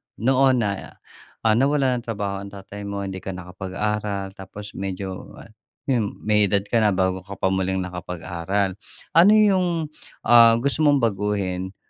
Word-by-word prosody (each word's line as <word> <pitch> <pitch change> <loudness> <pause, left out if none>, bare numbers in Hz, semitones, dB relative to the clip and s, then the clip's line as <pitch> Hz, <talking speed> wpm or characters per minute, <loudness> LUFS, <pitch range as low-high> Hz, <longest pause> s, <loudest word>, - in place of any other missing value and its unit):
noon 130 +3 +3
na, 100 -2 -4 0.5
ah, 110 - +4
nawalan 130 +1 +2
ng 120 - -15
trabaho 100 -3 -3
ang 100 - -8
tatay 100 +1 -8
mo, 100 0 -4
hindi 95 -1 -5
ka 95 0 -6
nakapag-aral, 95 +2 -4
tapos 100 +2 -9
medyo 95 -1 -5 0.6
yun, 120 -7 -1
may 105 -1 +3
edad 100 0 +1
ka 115 +3 +1
na 105 -3 +3
bago 95 0 +1
ka 100 +2 -10
pa 95 0 0
muling 95 0 0
nakapag-aral. 90 +2 -3 0.4
Ano 170 +5 +6
yung, 195 -4 +4 0.6
ah, 115 -1 +7
gusto 135 +6 0
mong 145 -3 +3
baguhin 100 -3 -1
100 Hz, 150 wpm, -23 LUFS, 95-115 Hz, 0.6 s, ah